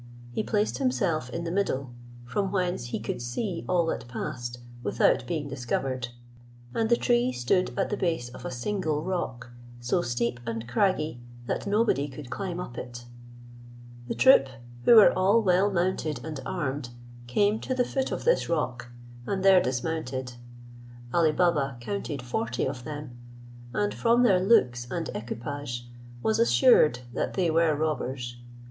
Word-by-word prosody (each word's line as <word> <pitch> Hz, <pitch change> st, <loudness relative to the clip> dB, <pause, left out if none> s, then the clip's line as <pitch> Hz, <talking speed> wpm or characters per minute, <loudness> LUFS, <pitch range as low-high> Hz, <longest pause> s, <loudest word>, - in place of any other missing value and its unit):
He 120 Hz, -, -1 dB
placed 215 Hz, +2 st, 0 dB
himself 195 Hz, -, 0 dB
in 170 Hz, +6 st, -4 dB
the 165 Hz, -, -3 dB
middle, 140 Hz, -9 st, -1 dB, 0.3 s
from 195 Hz, +9 st, -1 dB
whence 180 Hz, -8 st, -1 dB
he 120 Hz, -, -3 dB
could 115 Hz, +2 st, -4 dB
see 170 Hz, -, -3 dB
all 175 Hz, -2 st, +3 dB
that 160 Hz, -, -3 dB
passed 120 Hz, 0 st, -5 dB, 0.2 s
without -, -, +2 dB
being 155 Hz, -4 st, -2 dB
discovered; 130 Hz, -1 st, -2 dB, 0.7 s
and 225 Hz, -1 st, 0 dB
the 235 Hz, -, +6 dB
tree 240 Hz, -, +2 dB
stood 125 Hz, +9 st, +1 dB
at 195 Hz, -, 0 dB
the 210 Hz, -, 0 dB
base 165 Hz, -10 st, -1 dB
of 125 Hz, -, -11 dB
a -, -, -3 dB
single 155 Hz, +3 st, -2 dB
rock, 130 Hz, -11 st, -3 dB, 0.3 s
so 125 Hz, +9 st, 0 dB
steep 120 Hz, -3 st, -1 dB
and 115 Hz, -1 st, -4 dB
craggy 155 Hz, -1 st, 0 dB, 0.2 s
that -, -, -3 dB
nobody 205 Hz, -9 st, +2 dB
could 135 Hz, -2 st, -10 dB
climb 185 Hz, -3 st, -3 dB
up 120 Hz, -9 st, -6 dB
it. 120 Hz, -1 st, -8 dB, 1.0 s
The -, -, -3 dB
troop, 260 Hz, -, +6 dB, 0.4 s
who 235 Hz, -, +8 dB
were 215 Hz, -, +9 dB
all 190 Hz, +5 st, +4 dB
well 190 Hz, +1 st, +4 dB
mounted 175 Hz, -5 st, -1 dB
and 155 Hz, -3 st, -5 dB
armed, 135 Hz, -2 st, -3 dB, 0.4 s
came 205 Hz, -, +2 dB
to 260 Hz, -, -3 dB
the 250 Hz, -1 st, +2 dB
foot 265 Hz, +1 st, -2 dB
of -, -, -3 dB
this -, -, +2 dB
rock, 125 Hz, -8 st, -1 dB, 0.4 s
and 195 Hz, -1 st, -1 dB
there 190 Hz, -2 st, +7 dB
dismounted. 130 Hz, -1 st, -2 dB, 0.8 s
Ali 165 Hz, -3 st, +4 dB
Baba 150 Hz, -6 st, +1 dB
counted 145 Hz, -2 st, -4 dB
forty 120 Hz, -1 st, -2 dB
of 130 Hz, -2 st, -4 dB
them, 145 Hz, -5 st, -7 dB, 0.6 s
and, 105 Hz, -2 st, 0 dB
from 230 Hz, -, +3 dB
their 195 Hz, -7 st, +5 dB
looks 125 Hz, -, +3 dB
and 165 Hz, +4 st, -3 dB
equipage, 120 Hz, +1 st, -5 dB, 0.4 s
was 220 Hz, 0 st, +2 dB
assured 230 Hz, -, +5 dB
that -, -, -2 dB
they 180 Hz, -4 st, +2 dB
were 160 Hz, -1 st, +3 dB
robbers. 130 Hz, -5 st, -2 dB
155 Hz, 155 wpm, -27 LUFS, 125-190 Hz, 1.0 s, were